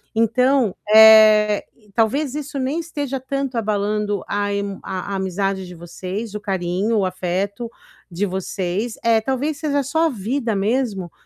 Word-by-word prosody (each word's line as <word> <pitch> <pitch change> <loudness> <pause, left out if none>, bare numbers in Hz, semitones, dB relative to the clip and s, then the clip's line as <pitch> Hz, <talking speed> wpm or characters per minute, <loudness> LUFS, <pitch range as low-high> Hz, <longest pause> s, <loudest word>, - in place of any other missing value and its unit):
Então, 250 0 +2 0.2
eh, 215 -1 +7 0.3
talvez 250 +5 +1
isso 290 -1 -5
nem 270 +6 -1
esteja 290 -5 -4
tanto 270 -1 -3
abalando 210 -1 -1
a 205 0 -1
emo 200 -1 -3
a 190 +1 -5
a - - -1
amizade 190 0 -2
de 180 - -10
vocês, 185 +5 -6
o - - -3
carinho, 195 +2 -1
o 190 - +1
afeto 190 +5 -3 0.4
de 180 +4 -2
vocês, 190 +3 -3
eh, 230 -1 +4
talvez 270 +5 -2
seja 285 -3 -1
só 320 +5 +1
a - - +2
vida 230 0 -2
mesmo, 200 -4 -1
215 Hz, 150 wpm, -20 LUFS, 195-260 Hz, 0.4 s, eh